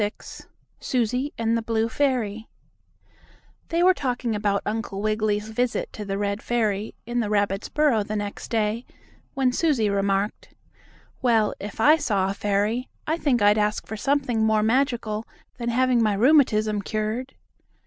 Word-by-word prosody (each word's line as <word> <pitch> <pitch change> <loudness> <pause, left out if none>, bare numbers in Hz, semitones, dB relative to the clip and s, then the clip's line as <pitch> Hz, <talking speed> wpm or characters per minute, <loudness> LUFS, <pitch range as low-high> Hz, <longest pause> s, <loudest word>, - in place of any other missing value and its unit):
XXVI 205 0 -5 0.3
SUSIE 250 +3 -1
AND 230 0 +1
THE 230 - 0
BLUE 225 0 0
FAIRY 230 -5 -1 1.2
They 335 +1 +1
were 370 +1 +6
talking 250 -7 -2
about 205 -1 0
Uncle 210 -2 -3
Wiggily's 215 0 0
visit 245 +2 -1
to 210 - -6
the 195 -1 -3
red 200 +1 -2
fairy, 215 -3 -1
in 240 +1 -2
the 215 -3 -1
rabbits' 200 -2 0
burrow 295 -8 +2
the 210 +1 -4
next 205 -1 -4
day, 220 +1 0 0.5
when 265 -2 +2
Susie 250 -7 +1
remarked: 200 +1 -1 0.7
"Well, 225 -5 +3
if 205 +2 -8
I 300 +7 +6
saw 195 -9 0
a - - -3
fairy, 210 +5 -1 0.2
I 315 - 0
think 255 -9 +1
I'd 205 +1 +5
ask 210 0 0
for 220 - -6
something 260 -2 0
more 220 -1 +3
magical 230 -3 0 0.3
than 235 0 -2
having 250 0 +2
my 215 -2 +2
rheumatism 215 -4 +3
cured." 220 +5 -3
220 Hz, 155 wpm, -24 LUFS, 210-250 Hz, 1.2 s, were